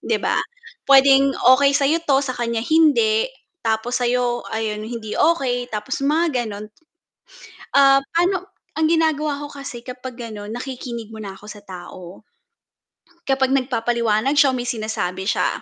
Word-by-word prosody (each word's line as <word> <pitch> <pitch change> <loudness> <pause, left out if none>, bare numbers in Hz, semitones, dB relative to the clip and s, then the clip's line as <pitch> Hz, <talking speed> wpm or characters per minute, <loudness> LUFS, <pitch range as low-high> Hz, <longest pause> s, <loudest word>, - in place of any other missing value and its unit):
'Di - - 0
ba? - - +1 0.5
Puwedeng 275 0 +6 0.2
okey 280 +1 +3
sa 285 - +1
'yo 330 +3 +2
'to 275 -2 +2
sa 255 - -3
kanya 235 -1 -2
hindi. 435 - +3 0.4
Tapos 225 +2 0
sa - - +1 0.5
ay 220 -1 -2
hindi 220 0 -6
okey 250 -7 +1
tapos 210 +5 -3
mga 300 -4 +1
gano'n 210 -1 -7 1.1
ah, 275 -1 +6 0.2
paano 365 +2 0 0.2
ang 315 - +3
ginagawa 310 -3 +1
ko 290 - -6
kasi 275 -4 -8
kapag 250 +1 -8
ga'non 215 -2 -7
nakikinig 240 -3 -6
mo 220 - -10
na 200 -3 -7
ako 205 - -15
sa 210 -1 -10
tao, 180 0 -10 1.0
kapag 265 -1 +1
nagpapaliwanag 240 -1 0
siya 270 -3 +5
may 245 -1 -3
sinasabi 215 -5 -3
siya, - - +1
250 Hz, 145 wpm, -21 LUFS, 220-280 Hz, 1.1 s, Puwedeng